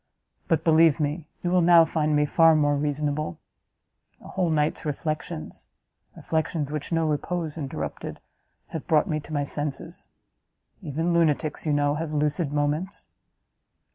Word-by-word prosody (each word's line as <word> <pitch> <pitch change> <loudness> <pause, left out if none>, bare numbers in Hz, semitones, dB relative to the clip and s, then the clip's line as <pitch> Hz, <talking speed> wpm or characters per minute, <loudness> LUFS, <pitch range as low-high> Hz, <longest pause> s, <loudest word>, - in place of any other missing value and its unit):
But, 160 -1 +1
believe 160 -1 +5
me, 150 +2 -2 0.2
you 175 - 0
will 180 0 +4
now 170 -1 +7
find 155 -1 0
me 150 0 +3
far 165 +2 +5
more 145 -1 +3
reasonable; 145 - -2 0.8
a - - -13
whole 185 -3 0
night's 150 -1 0
reflections 155 - -4 0.5
reflections 160 -2 -2
which 150 +1 -4
no 165 -1 +2
repose 155 +1 -2
interrupted! 145 -5 -5 0.5
have 160 - -6
brought 155 -3 +4
me 155 -1 -1
to 150 - -12
my 145 -2 0
senses. 145 +3 -5 0.7
Even 165 +1 -1
lunatics, 155 -2 +1
you - - +2
know, 145 0 +2
have 155 +1 -4
lucid 150 +1 0
moments!" 150 +6 -2
155 Hz, 140 wpm, -25 LUFS, 145-165 Hz, 0.8 s, now